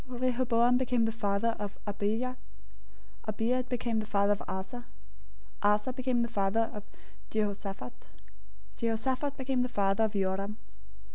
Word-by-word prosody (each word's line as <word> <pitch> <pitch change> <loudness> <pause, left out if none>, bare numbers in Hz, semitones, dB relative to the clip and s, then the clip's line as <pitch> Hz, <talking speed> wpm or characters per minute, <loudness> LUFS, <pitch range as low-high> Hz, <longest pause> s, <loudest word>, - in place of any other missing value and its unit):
Rehoboam 245 -1 +3
became 245 -3 +2
the 225 - +1
father 220 +1 +1
of 205 -1 -4
Abijah. 215 +5 -1 0.9
Abijah 230 +4 +1
became 235 -2 0
the 215 - -3
father 200 -1 +3
of 205 - -5
Asa. 240 +6 -5 0.7
001:008 205 - +5
Asa 210 +5 -1
became 255 -2 +1
the - - 0
father 225 0 +1
of 210 - -6 0.5
Jehoshaphat. 200 - -3 0.7
Jehoshaphat 260 +5 0
became 265 -1 0
the 250 - 0
father 200 -1 +2
of 215 - -2
Joram. 195 +1 0
225 Hz, 135 wpm, -31 LUFS, 205-250 Hz, 0.9 s, 001:008